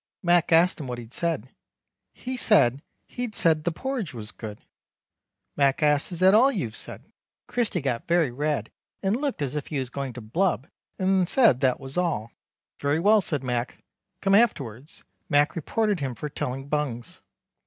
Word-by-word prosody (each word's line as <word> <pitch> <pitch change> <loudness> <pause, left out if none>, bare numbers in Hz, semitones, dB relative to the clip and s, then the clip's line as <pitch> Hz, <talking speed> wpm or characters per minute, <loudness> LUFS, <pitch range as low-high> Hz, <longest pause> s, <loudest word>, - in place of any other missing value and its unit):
Mac 175 -1 +3
asked 170 +3 +4
him 145 - -5
what 125 -1 -4
he'd 120 0 -10
said. 160 -8 -2 0.6
He 255 +1 -6
said 145 - +3 0.2
he'd 245 -3 -5
said 155 -2 +2
the 175 - +2
porridge 240 - -4
was 110 -1 -5
good. 105 -2 -8 1.0
Mac 140 +1 +2
asked 150 +3 +2
Is 175 0 -5
that 190 +1 +6
all 250 +6 +6
you've 165 - -3
said. - - -8 0.4
Christy 240 -8 -1
got 125 -4 -2
very 170 -6 +2
red 145 +3 -2 0.3
and 195 +2 +2
looked 275 - -2
as 140 +1 -3
if 150 - -3
he 150 - -3
was 130 -2 -3
going 135 -2 -4
to 125 - -8
blub 150 - 0 0.3
and 185 -1 +2
said 230 - +5
that 130 -2 +2
was 135 +2 -6
all. 145 -11 -1 0.5
Very 145 +2 +1
well 210 +4 +5
said 150 -6 -2
Mac 125 -1 -3 0.4
Come 195 0 +2
afterwards. 145 - +1 0.3
Mac 145 +1 +3
reported 205 +4 0
him 135 -3 -3
for 150 - -5
telling 135 0 -4
bungs. 140 -6 -3
150 Hz, 175 wpm, -26 LUFS, 130-190 Hz, 1.0 s, that